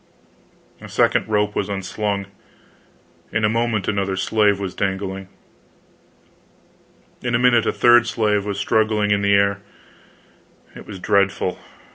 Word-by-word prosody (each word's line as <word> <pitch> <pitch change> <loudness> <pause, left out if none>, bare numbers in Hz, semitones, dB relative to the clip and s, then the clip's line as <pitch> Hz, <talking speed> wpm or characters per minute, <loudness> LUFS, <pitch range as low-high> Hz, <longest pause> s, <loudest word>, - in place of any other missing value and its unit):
A - - -10
second - - +1
rope 105 -1 0
was 100 - -2
unslung, 100 +1 -3 1.1
in 110 0 0
a - - +2
moment 115 -2 -1
another 100 -2 -1
slave 105 +1 +1
was 95 -2 -4
dangling. 95 -1 -3 1.9
In 120 -1 -1
a - - +4
minute 120 -1 +3
a - - +2
third 120 0 +4
slave 105 -3 0
was 100 -1 -4
struggling 110 0 +1
in 100 0 +2
the 100 0 +3
air. 100 0 +2 1.1
It - - -12
was 100 - -8
dreadful. 100 -1 0
105 Hz, 130 wpm, -21 LUFS, 100-110 Hz, 1.9 s, a